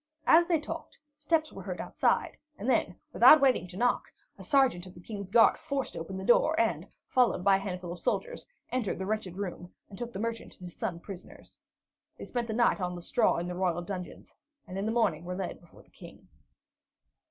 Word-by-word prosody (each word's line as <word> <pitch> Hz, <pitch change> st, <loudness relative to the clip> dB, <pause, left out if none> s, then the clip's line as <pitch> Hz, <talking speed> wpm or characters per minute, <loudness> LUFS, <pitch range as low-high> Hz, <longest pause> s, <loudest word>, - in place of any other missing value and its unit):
As 335 Hz, +2 st, +6 dB
they 335 Hz, -3 st, +2 dB
talked, 330 Hz, +2 st, -7 dB, 0.2 s
steps 310 Hz, +1 st, 0 dB
were -, -, -8 dB
heard -, -, -6 dB
outside; -, -, 0 dB, 0.2 s
and 215 Hz, -, -6 dB
then, 260 Hz, -, +1 dB, 0.2 s
without 310 Hz, -, +8 dB
waiting 255 Hz, -10 st, +3 dB
to 180 Hz, +1 st, -10 dB
knock, 245 Hz, +2 st, +1 dB, 0.2 s
a -, -, -13 dB
sergeant 260 Hz, -, +2 dB
of 180 Hz, -, -13 dB
the -, -, -12 dB
King's 200 Hz, +1 st, -7 dB
guard 225 Hz, +3 st, +5 dB
forced 280 Hz, -4 st, -3 dB
open 190 Hz, +4 st, -6 dB
the 190 Hz, -, -5 dB
door, 315 Hz, +8 st, +4 dB
and, 340 Hz, -, 0 dB, 0.2 s
followed 250 Hz, -7 st, +2 dB
by 195 Hz, 0 st, +5 dB
a -, -, -5 dB
handful 180 Hz, -3 st, -5 dB
of 175 Hz, -, -7 dB
soldiers, -, -, -2 dB, 0.2 s
entered 245 Hz, -6 st, -1 dB
the 190 Hz, -, -4 dB
wretched 205 Hz, -3 st, -3 dB
room 180 Hz, -2 st, -5 dB, 0.2 s
and 195 Hz, -, -10 dB
took 240 Hz, -1 st, -5 dB
the -, -, -7 dB
merchant 230 Hz, +2 st, -4 dB
and 180 Hz, -, -8 dB
his 175 Hz, -, -12 dB
son 185 Hz, -7 st, -3 dB
prisoners. 190 Hz, 0 st, -12 dB, 0.6 s
They -, -, -8 dB
spent 240 Hz, -2 st, -3 dB
the 220 Hz, -, -3 dB
night 235 Hz, -4 st, +3 dB
on 180 Hz, 0 st, -2 dB
the 175 Hz, -, -7 dB
straw 230 Hz, -, +2 dB
in 170 Hz, +1 st, -3 dB
the 180 Hz, -, -4 dB
royal 175 Hz, -1 st, -1 dB
dungeons, 180 Hz, -1 st, -8 dB, 0.3 s
and 185 Hz, -, -9 dB
in 195 Hz, +2 st, -2 dB
the -, -, 0 dB
morning 195 Hz, -9 st, +1 dB
were 180 Hz, +1 st, -5 dB
led 190 Hz, -1 st, -5 dB
before 175 Hz, -, -18 dB
the -, -, -29 dB
King. -, -, -14 dB
200 Hz, 215 wpm, -29 LUFS, 180-250 Hz, 0.6 s, without